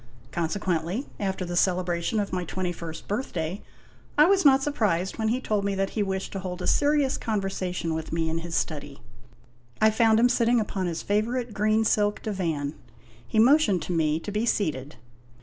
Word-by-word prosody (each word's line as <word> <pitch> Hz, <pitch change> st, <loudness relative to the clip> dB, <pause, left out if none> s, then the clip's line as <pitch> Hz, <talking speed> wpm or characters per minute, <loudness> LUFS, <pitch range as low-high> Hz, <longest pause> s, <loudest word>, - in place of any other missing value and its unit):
Consequently, 170 Hz, -, -1 dB
after 190 Hz, -2 st, -2 dB
the 175 Hz, 0 st, -4 dB
celebration 180 Hz, +2 st, +1 dB
of 200 Hz, -2 st, -3 dB
my 180 Hz, -1 st, -1 dB
twenty 180 Hz, +1 st, -3 dB
first 165 Hz, -2 st, -8 dB
birthday, 195 Hz, -5 st, -3 dB, 0.6 s
I 300 Hz, -, +8 dB
was 385 Hz, +2 st, +4 dB
not 270 Hz, -2 st, +6 dB
surprised 210 Hz, -, 0 dB
when 220 Hz, -, +1 dB
he 240 Hz, +3 st, +1 dB
told 210 Hz, -5 st, -1 dB
me 200 Hz, 0 st, -1 dB
that 195 Hz, 0 st, -1 dB
he 215 Hz, -, -1 dB
wished 190 Hz, -1 st, -2 dB
to 195 Hz, -, -4 dB
hold 180 Hz, -1 st, -5 dB
a -, -, -3 dB
serious 290 Hz, -2 st, +2 dB
conversation 190 Hz, -5 st, -2 dB
with 160 Hz, 0 st, -4 dB
me 165 Hz, 0 st, 0 dB
in 160 Hz, +1 st, -1 dB
his 165 Hz, 0 st, -5 dB
study. 145 Hz, -3 st, -3 dB, 0.8 s
I 220 Hz, 0 st, +5 dB
found 220 Hz, 0 st, +4 dB
him 240 Hz, -, +6 dB
sit 245 Hz, -1 st, +2 dB
ting 240 Hz, +1 st, +4 dB
upon 195 Hz, -3 st, -2 dB
his 170 Hz, -1 st, -3 dB
favorite 230 Hz, +3 st, -1 dB
green 215 Hz, +2 st, +2 dB
silk 210 Hz, -1 st, +1 dB
divan. 165 Hz, -9 st, -2 dB, 0.5 s
He -, -, -3 dB
motioned 225 Hz, -, +5 dB
to -, -, -5 dB
me 155 Hz, -1 st, +1 dB
to 205 Hz, -, -5 dB
be 210 Hz, +2 st, -1 dB
seated. 150 Hz, -, -1 dB
195 Hz, 185 wpm, -26 LUFS, 170-220 Hz, 0.8 s, I